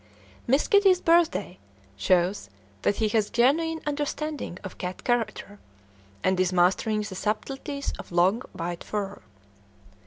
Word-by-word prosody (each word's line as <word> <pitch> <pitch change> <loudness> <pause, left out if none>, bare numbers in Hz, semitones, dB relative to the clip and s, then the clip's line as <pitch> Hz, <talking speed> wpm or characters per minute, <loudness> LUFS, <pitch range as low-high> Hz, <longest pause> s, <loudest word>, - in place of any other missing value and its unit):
"Miss 270 +5 +3
Kitty's 395 -3 +5
Birthday" 330 - +2 0.4
shows 175 - +1 0.3
that 205 - +2
he 220 - +1
has 210 -1 +1
genuine 320 +7 +2
understanding 295 - -3
of 190 - -9
cat 180 0 -5
character, 230 -4 -1 0.6
and 185 0 +2
is 185 0 +2
mastering 190 +4 +2
the 205 - -6
subtleties 270 +8 -3
of - - -9
long 180 +7 +3
white 170 0 -4
fur. 200 -2 -4
215 Hz, 125 wpm, -26 LUFS, 185-285 Hz, 0.6 s, Kitty's